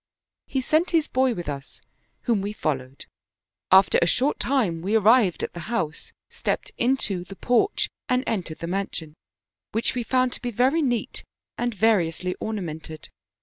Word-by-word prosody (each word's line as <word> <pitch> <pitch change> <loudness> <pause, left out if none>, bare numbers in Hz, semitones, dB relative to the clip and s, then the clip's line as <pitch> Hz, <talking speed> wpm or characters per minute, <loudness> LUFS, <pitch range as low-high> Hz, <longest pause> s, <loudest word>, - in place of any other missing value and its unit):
* - - -67
" - - -66
He 265 - -1
sent 310 +6 +2
his 325 -3 +2
boy 260 -2 +2
with 175 -4 -6
us, 140 -1 -6 0.4
whom 230 -5 +1
we 205 +2 -3
followed; 135 -8 -3 0.7
after 190 +1 +6
a 170 - +4
short 265 - +1
time 220 -12 +1
we 200 +5 0
arrived 220 -3 +4
at - - -3
the 175 - -7
house, 160 -10 -2 0.2
stepped - - -3
into 235 -7 +1
the 195 +2 -10
porch 250 - +2 0.2
and 250 +1 +2
entered 180 -7 -2
the - - -2
mansion, 175 -4 -3 0.6
which 225 +2 +1
we 250 - -1
found 255 +1 +1
to - - -8
be 245 - -2
very 255 +8 +2
neat 245 -5 -1 0.3
and 240 -2 -2
variously 180 -4 +2
ornamented. 160 -7 -5
215 Hz, 170 wpm, -25 LUFS, 170-250 Hz, 0.7 s, after